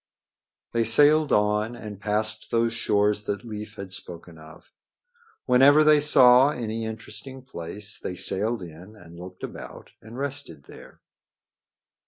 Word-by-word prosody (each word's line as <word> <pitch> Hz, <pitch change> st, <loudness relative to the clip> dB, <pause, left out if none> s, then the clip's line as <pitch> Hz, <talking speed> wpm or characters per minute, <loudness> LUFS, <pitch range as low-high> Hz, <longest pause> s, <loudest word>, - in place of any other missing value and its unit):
They 115 Hz, -1 st, +1 dB
sailed 145 Hz, +7 st, +4 dB
on 105 Hz, +2 st, +1 dB
and 105 Hz, -4 st, -10 dB
past 110 Hz, +1 st, -1 dB
those 115 Hz, 0 st, 0 dB
shores 105 Hz, -2 st, 0 dB
that 105 Hz, +4 st, -4 dB
Leif 105 Hz, -2 st, -8 dB
had 95 Hz, -1 st, -9 dB
spoken 85 Hz, -3 st, -9 dB
of. 80 Hz, +2 st, -16 dB, 0.7 s
Whenever 140 Hz, +4 st, +5 dB
they 150 Hz, -1 st, +5 dB
saw 130 Hz, -2 st, +6 dB
any 115 Hz, -4 st, -4 dB
interesting 110 Hz, +4 st, -8 dB
place 100 Hz, -2 st, -8 dB
they 90 Hz, -, -6 dB
sailed 105 Hz, +4 st, -2 dB
in 90 Hz, +5 st, -12 dB
and 85 Hz, -4 st, -15 dB
looked 90 Hz, +1 st, -11 dB
about -, -, -9 dB
and 115 Hz, +2 st, -12 dB
rested 140 Hz, -, -5 dB
there. -, -, -15 dB
110 Hz, 135 wpm, -24 LUFS, 100-125 Hz, 0.7 s, saw